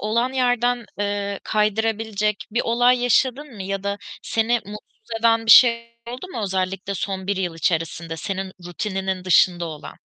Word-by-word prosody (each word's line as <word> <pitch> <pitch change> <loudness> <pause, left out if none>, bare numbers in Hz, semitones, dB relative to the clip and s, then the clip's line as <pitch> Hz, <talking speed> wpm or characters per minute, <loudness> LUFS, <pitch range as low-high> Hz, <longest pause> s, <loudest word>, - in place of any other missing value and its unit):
olan 235 +4 0
yerden, 245 -2 +1
eee, 200 -1 -2
kaydırabilecek 215 -1 0
bir 235 +3 0
olay 245 +1 +3
yaşadın 260 +3 +1
mı 195 - -6
ya 195 0 -3
da 200 0 -2 0.2
seni 225 +1 0
mutsuz 210 +2 -12
eden 225 0 +3
bir - - +4
şeyler 235 -2 +7 0.2
oldu 250 +8 -7
mu, 235 -11 -5
özellikle 190 0 -2
son 190 0 -4
1 200 0 0
yıl 180 -3 -2
içerisinde 165 0 -2
senin 190 +2 -4
rutininin 190 0 -3
dışında 175 -1 +4
olan? 155 -2 -9
210 Hz, 155 wpm, -22 LUFS, 190-235 Hz, 0.2 s, şeyler